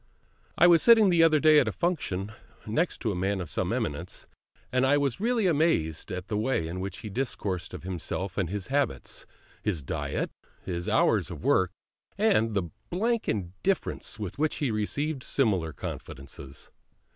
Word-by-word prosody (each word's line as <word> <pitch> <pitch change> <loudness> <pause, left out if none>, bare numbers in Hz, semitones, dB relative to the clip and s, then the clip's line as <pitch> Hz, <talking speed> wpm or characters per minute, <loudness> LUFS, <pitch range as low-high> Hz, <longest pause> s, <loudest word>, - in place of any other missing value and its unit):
I - - +6
was 170 -2 +7
sitting 225 -5 +7
the 170 -1 +4
other 160 -2 +5
day 155 0 +7
at - - +2
a - - +1
function 110 - -1 0.3
next 150 +7 -1
a 110 - +1
man 95 +2 0
of 85 -4 -5
some - - -1
eminence, 85 +5 -3 0.5
and 130 +1 +2
I 140 +2 +4
was 140 +1 0
really 230 0 +1
amazed 145 - +1
at 90 0 -4
the 105 0 -1
way 110 -8 0
in 90 +3 -5
which 95 -1 -5
he 105 - -6
discoursed 100 -6 -2
of - - -9
himself 95 +1 -4
and 95 -5 -1
his 100 +2 -4
habits, 140 +1 -1 0.3
his 90 -9 -1
diet, - - -2 0.3
his 85 -2 -3
hours - - +3
of - - -8
work, 95 -2 +3 0.5
and 115 - +3
the 85 -5 -1 0.2
blank 225 +6 0
indifference 105 - -2
with 105 +3 -6
which 155 0 +1
he 140 -5 -1
received 135 +7 -1
similar 100 - +1
confidences. 70 0 -8
110 Hz, 170 wpm, -28 LUFS, -, 0.5 s, was